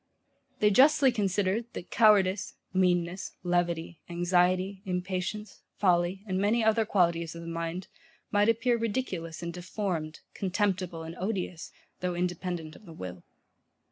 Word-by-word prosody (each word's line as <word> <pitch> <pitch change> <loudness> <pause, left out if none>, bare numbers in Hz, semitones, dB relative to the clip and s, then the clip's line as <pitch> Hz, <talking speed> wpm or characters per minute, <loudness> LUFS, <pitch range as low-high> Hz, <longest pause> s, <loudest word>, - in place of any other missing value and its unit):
They 210 0 +5
justly 275 +3 +6
considered 205 0 0
that - - -8
cowardice, 200 -3 +4 0.2
meanness, 180 -1 +1
levity, 175 -2 -1
anxiety, 180 +2 +1
impatience, 185 +3 -3 0.2
folly, 180 0 +2
and 185 -2 -1
many 215 +4 +2
other 220 0 +3
qualities 170 -5 +1
of 170 - -7
the - - -8
mind, 165 +2 -4 0.4
might 205 +1 +4
appear 230 +1 +2
ridiculous 190 -8 -3
and 170 0 -4
deformed, 175 -3 -3
contemptible 185 -3 -1
and 165 +1 -7
odious, 185 -4 -3 0.3
though 180 -1 -2
independent 175 -2 -3
of 210 - -16
the 165 - -10
will. 90 - -8
185 Hz, 130 wpm, -29 LUFS, 170-205 Hz, 0.4 s, justly